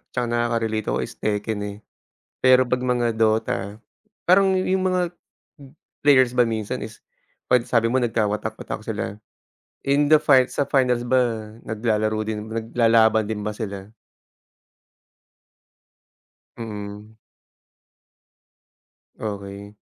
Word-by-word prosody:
tsaka 125 Hz, -1 st, -2 dB
nakakarelate 115 Hz, -2 st, -1 dB
ako -, -, 0 dB
is -, -, -9 dB
Tekken 105 Hz, 0 st, -2 dB
eh. 100 Hz, 0 st, -5 dB, 0.6 s
Pero 130 Hz, -1 st, +4 dB
'pag 125 Hz, 0 st, 0 dB
mga 120 Hz, -1 st, +1 dB
DOTA, 110 Hz, -1 st, 0 dB, 0.5 s
parang 190 Hz, +1 st, +5 dB
yung 185 Hz, 0 st, 0 dB
mga 185 Hz, -1 st, +2 dB, 1.0 s
players 130 Hz, -4 st, +5 dB
ba 120 Hz, -, +5 dB
minsan 110 Hz, -2 st, -3 dB
is -, -, -13 dB, 0.5 s
'pag 125 Hz, -1 st, +3 dB
sabi 115 Hz, -1 st, +2 dB
mo 130 Hz, -, +1 dB
nagkawatak-watak 110 Hz, -2 st, -2 dB
sila, 105 Hz, -2 st, -4 dB, 0.7 s
in 145 Hz, +1 st, +3 dB
the 155 Hz, -, +7 dB
fins 135 Hz, -4 st, +3 dB
sa -, -, +2 dB
finals 125 Hz, -3 st, +2 dB
ba 130 Hz, +1 st, +4 dB, 0.5 s
naglalaro 110 Hz, -1 st, 0 dB
din 110 Hz, -1 st, -4 dB
naglalaban 115 Hz, -1 st, +2 dB
din 105 Hz, -1 st, -4 dB
ba 105 Hz, -, -2 dB
sila? 100 Hz, -2 st, -6 dB, 2.7 s
Mm. 105 Hz, -1 st, -8 dB, 2.0 s
Okey. 100 Hz, -1 st, -6 dB
110 Hz, 110 wpm, -23 LUFS, 105-125 Hz, 2.7 s, the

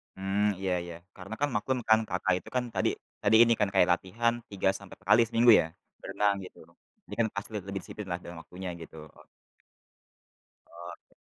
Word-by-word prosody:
Hmm, 100 Hz, +2 st, +1 dB
iya 95 Hz, -1 st, -1 dB
iya. 85 Hz, -1 st, -8 dB, 0.2 s
Karena 100 Hz, +3 st, -8 dB
kan 145 Hz, 0 st, +1 dB
maklum 125 Hz, +5 st, 0 dB
kan 110 Hz, 0 st, +7 dB
Kakak 90 Hz, 0 st, 0 dB
itu -, -, -13 dB
kan 125 Hz, -, +2 dB
tadi -, -, +2 dB, 0.3 s
tadi 105 Hz, +2 st, +4 dB
ini 115 Hz, 0 st, +4 dB
kan 105 Hz, -2 st, +2 dB
kayak 90 Hz, -2 st, +5 dB
latihan 115 Hz, +6 st, -1 dB, 0.2 s
3 95 Hz, -1 st, +1 dB
sampai 100 Hz, -2 st, -10 dB
4 -, -, -22 dB
kali 115 Hz, -, +6 dB
seminggu 115 Hz, +1 st, +5 dB
ya, 80 Hz, -, -4 dB, 0.3 s
berenang 105 Hz, -1 st, +1 dB
gitu. 90 Hz, -, -12 dB, 0.5 s
Ini -, -, -7 dB
kan 115 Hz, -, +3 dB
pasti 100 Hz, -, -5 dB
le 105 Hz, -, -1 dB
lebih 100 Hz, 0 st, -3 dB
disiplin 105 Hz, 0 st, -9 dB
lah 85 Hz, -, -2 dB
dengan 85 Hz, -1 st, -9 dB
waktunya 90 Hz, 0 st, -7 dB
gitu 80 Hz, 0 st, -11 dB, 0.2 s
oke. -, -, -20 dB, 1.4 s
Oke. 85 Hz, 0 st, -12 dB
100 Hz, 190 wpm, -29 LUFS, 90-110 Hz, 1.4 s, kan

